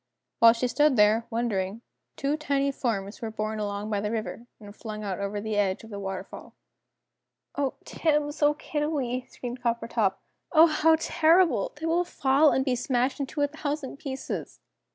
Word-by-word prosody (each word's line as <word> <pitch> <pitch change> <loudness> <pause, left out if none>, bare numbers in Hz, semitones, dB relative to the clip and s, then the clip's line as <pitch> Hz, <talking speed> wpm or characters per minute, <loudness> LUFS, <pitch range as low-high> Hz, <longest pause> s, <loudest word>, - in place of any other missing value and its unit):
While 230 0 +8
she 240 +2 -1
stood 295 +2 +3
there, 215 +1 +4
wondering, 225 -2 -2 0.3
two 280 +1 0
tiny 280 -2 0
forms 215 -6 -3
were 225 - -3
borne 215 0 -3
along 205 +1 -3
by 205 -1 0
the 210 - -2
river, 230 +1 -4
and 205 -1 -12
flung 215 -2 -7
out 195 -2 -3
over 200 +1 -3
the 215 0 -3
edge 195 -1 0
of 225 - -12
the 200 - -5
waterfall. 195 -1 -7 1.0
"Oh, 280 -2 -1
Tibbs! 300 -1 0
Oh, 295 0 +4
Kiddiwee!" 295 -5 -2
screamed 245 0 -7
Coppertop. 230 -4 0 0.4
"Oh, 320 -1 +8
how 320 0 +4
terrible! 320 - +3
They 305 +2 -6
will 335 +2 +2
fall 285 -3 +3
and 265 -1 +1
be 255 -2 +1
smashed 250 +2 0
into 280 +2 -3
a - - +3
thousand 290 -2 -4
pieces!" 275 -2 -5
245 Hz, 170 wpm, -27 LUFS, 215-295 Hz, 1.0 s, While